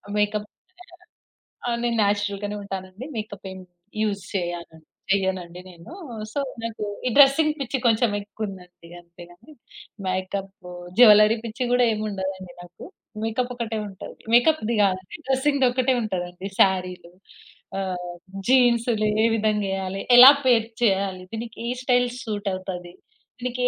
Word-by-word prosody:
Makeup 210 0 0 1.2
ఆహ్, 235 -1 0
నేను 240 -1 0
natural 205 0 0
గానే 205 0 -3
ఉంటానండి. 195 +3 -7
మేకప్ 210 -2 -7
ఏం 190 - -9 0.4
యూజ్ 205 -2 -1
చేయాన్ 175 -3 -4 0.4
చేయనండి 185 -3 -1
నేను. 175 - -13 0.4
సో, 285 - -2 0.2
నాకూ 225 -2 -5 0.2
ఈ - - +2
డ్రెసింగ్ 290 +2 +6
పిచ్చి 275 0 -2
కొంచెం 225 0 +3
ఎక్కువుందండి. 195 -5 -9
అంతే 170 0 -15
కానీ 230 - -17 0.5
మేకప్, 190 +1 -3 0.5
జ్యులరీ 215 -1 +7
పిచ్చి 230 +3 -4
కూడా 245 0 +4
ఏమి 215 - -4
ఉండదండి 190 -2 -5
నాకు. 175 0 -13 0.4
మేకప్ 245 +3 -1
ఒకటే 230 -2 -3
ఉంటది. 190 -2 -10 0.2
మేకప్‌ది 240 -2 +3
కాదు 185 -1 +1 0.3
డ్రెసింగ్‌ది 270 0 +2
ఒక్కటే 255 +1 +1
ఉంటదండి. 185 -2 -4
సారీలు 180 -2 +1 0.7
ఆహ్, 180 -2 -4 0.4
జీన్స్‌లు 235 -4 +3 0.2
ఏ - - +5
విధంగేయాలి? 195 -3 -1 0.2
ఎలా 255 +3 +12
పెయిర్ 230 -3 +4 0.2
చేయాలి? 195 -3 +1
దీనికి 230 0 -6
ఏ - - -1
స్టైల్ 245 -1 +2
సూట్ 205 -3 -3
అవుతది? 180 -2 -6 0.5
దీనికి 250 0 -4
210 Hz, 125 wpm, -24 LUFS, 185-235 Hz, 1.2 s, ఎలా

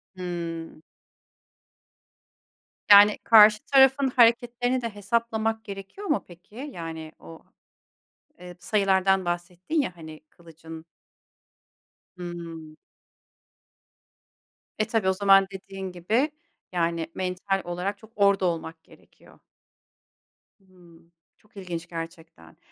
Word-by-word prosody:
Hıı. 170 -3 -6 2.1
Yani 205 +1 +8
karşı 215 -1 +7
tarafın 270 0 +4
hareketlerini 245 +1 +2
de 230 - -3
hesaplamak 220 +1 -1
gerekiyor 200 - -8
mu 300 - 0
peki? 175 +4 -17 0.2
Yani 160 -2 -7
o, 80 0 -13 1.0
eee, 180 0 -11
sayılardan 190 0 +1
bahsettin 175 - -2
ya 255 - -3
hani 155 -1 -11
kılıcın 165 -1 -13 1.3
Hıı. 170 -3 -8 2.0
E, 215 - +2
tabii 220 -4 0
o - - +2
zaman 195 0 +4
dediğin 195 0 -8
gibi 220 - 0 0.4
yani 170 -2 -1
mental 185 +1 -2
olarak 180 +4 -4
çok 220 +3 -18
orada 200 -2 +3
olmak 165 -1 -4
gerekiyor. - - -21 1.2
Hıı, 180 -3 -21 0.4
çok 210 -1 -25
ilginç 175 -3 -6
gerçekten. 165 - -10
185 Hz, 95 wpm, -25 LUFS, 170-215 Hz, 2.1 s, Yani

